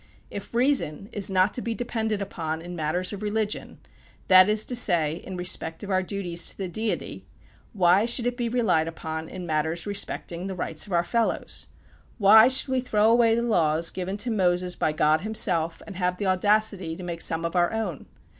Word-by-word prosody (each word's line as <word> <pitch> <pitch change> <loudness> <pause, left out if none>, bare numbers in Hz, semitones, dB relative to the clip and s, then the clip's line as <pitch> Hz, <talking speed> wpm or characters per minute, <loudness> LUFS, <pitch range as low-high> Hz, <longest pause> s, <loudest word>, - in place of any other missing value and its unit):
If 205 +3 -8
reason 235 - 0
is 200 -2 -1
not 190 +1 +2
to 245 - -4
be 230 -1 -3
depended 220 -4 -2
upon 160 -5 -5
in 175 +2 -8
matters 175 +4 -1
of 200 - -7
religion, 210 0 -3 0.5
that 185 +1 +7
is 215 0 +2
to 250 - -3
say, 165 -9 +3
in 185 +1 -8
respect 170 -2 -2
of 205 - -5
our 185 0 +2
duties 180 -2 -1
to - - -6
the 195 - -4
Deity, 215 +5 -4 0.5
why 185 +1 +3
should 240 0 +1
it 245 0 -1
be 240 -2 -2
relied 225 -10 +1
upon 160 -1 -6
in 185 -1 -7
matters 160 +1 -1
respecting 195 -3 -2
the 190 - -5
rights 165 0 -2
of - - -11
our 170 -1 +2
fellows? 230 +5 -2 0.5
Why 220 +2 +7
should 260 +1 +3
we 260 0 +1
throw 220 -3 +2
away 230 -1 +4
the 235 - -1
laws 165 -7 +2
given 190 +2 -4
to 240 - -2
Moses 180 -3 0
by 155 - 0
God 155 +1 +2
himself, 180 -6 0
and 200 -4 -9
have 180 -1 -1
the 205 - -3
audacity 190 -2 +1
to 185 - -9
make 170 -1 -5
some 165 +1 +1
of 170 - -4
our 175 -1 +2
own? 215 -9 -4
190 Hz, 200 wpm, -25 LUFS, 170-220 Hz, 0.5 s, that